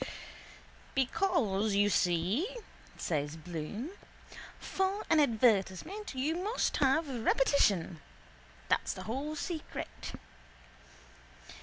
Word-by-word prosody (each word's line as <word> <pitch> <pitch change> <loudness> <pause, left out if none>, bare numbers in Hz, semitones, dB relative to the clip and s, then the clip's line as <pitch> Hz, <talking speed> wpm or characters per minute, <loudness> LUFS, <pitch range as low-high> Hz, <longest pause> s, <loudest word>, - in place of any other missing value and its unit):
—Because, 240 - +1
you 205 +1 +4
see, 190 - +1 0.4
says 150 -1 -2
Bloom, 175 - -5 0.7
for 385 +2 -1
an 320 - +6
advertisement 235 - +2
you 285 +5 0
must 415 +7 0
have 285 +4 +3
repetition. 225 - +2 0.7
That's - - +1
the - - -7
whole 275 +7 -3
secret. 320 0 -5
255 Hz, 85 wpm, -32 LUFS, 190-320 Hz, 0.7 s, an